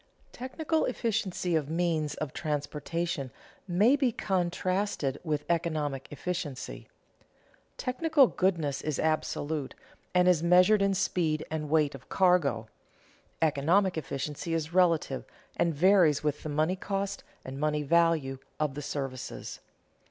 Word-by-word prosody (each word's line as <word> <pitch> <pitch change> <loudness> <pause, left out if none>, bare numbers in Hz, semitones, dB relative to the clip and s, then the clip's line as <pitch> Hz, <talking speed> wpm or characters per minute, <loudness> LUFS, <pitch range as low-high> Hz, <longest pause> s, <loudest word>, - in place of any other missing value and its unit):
Technical 310 +5 -1
efficiency 210 -8 -1
of 150 -2 0
means 160 -3 0
of 150 -4 -5
transportation 150 0 -3 0.4
may 205 +9 +4
be 270 -4 +2
contrasted 185 -6 -1
with 150 -3 -2
economic 155 -5 -1
efficiency. 150 -3 -5 0.9
Technical 290 +2 +3
goodness 170 - 0
is 155 -3 -2
absolute, 155 -2 -1 0.4
and 180 0 +5
is 180 -4 +4
measured 180 +4 +5
in 195 -1 +2
speed 165 -5 0
and 155 -2 -3
weight 150 -2 +2
of 135 -1 -12
cargo; 150 - +2 0.8
economic 165 +6 +2
efficiency 150 +2 -3
is 160 0 -3
relative, 170 -7 +2 0.3
and 170 -2 +1
varies 170 -3 +4
with 150 -1 -1
the 155 - -5
money 155 +5 +1
cost 195 +1 -3 0.2
and 135 +1 -6
money 150 0 0
value 160 -4 +2 0.2
of 150 -3 0
the 145 - -5
services. 135 -3 -5
165 Hz, 120 wpm, -29 LUFS, 145-185 Hz, 0.9 s, and